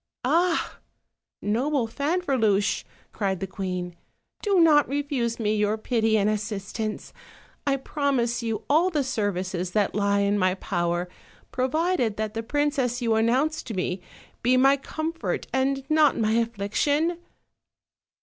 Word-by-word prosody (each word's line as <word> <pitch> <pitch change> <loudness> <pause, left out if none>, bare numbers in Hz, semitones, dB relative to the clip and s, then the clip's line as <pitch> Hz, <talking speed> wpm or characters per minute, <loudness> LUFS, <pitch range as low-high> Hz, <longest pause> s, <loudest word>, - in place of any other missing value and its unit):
"Ah! 335 +5 +1 0.6
noble 250 +5 +1
Fanferluche," 260 - +1 0.3
cried 195 -3 -1
the 195 - -2
queen, 180 -2 -4 0.5
"do 400 -3 +2
not 305 -4 +6
refuse 275 -5 -1
me 215 -1 +1
your 210 +1 +1
pity 220 -1 +1
and 205 -1 +2
assistance; 215 0 -3 0.5
I 275 -1 +3
promise 265 -4 -1
you 225 -2 -3
all 325 +6 +4
the 300 -5 0
services 185 -7 -2
that 210 -2 +1
lie 200 -1 +2
in 200 +1 +1
my 185 0 +2
power, 175 -2 -1 0.4
provided 260 - 0
that 215 -1 -2
the 225 - -2
princess 270 -1 0
you 230 -1 +2
announce 255 +8 +2
to 225 - -7
me 180 0 -2 0.4
be 250 +2 +3
my 270 +2 +6
comfort, 315 +4 -3
and 270 +1 0
not 310 -1 +4
my 220 -1 +1
afflic 225 -3 -1
tion." 320 +4 +1
230 Hz, 135 wpm, -25 LUFS, 205-285 Hz, 0.6 s, not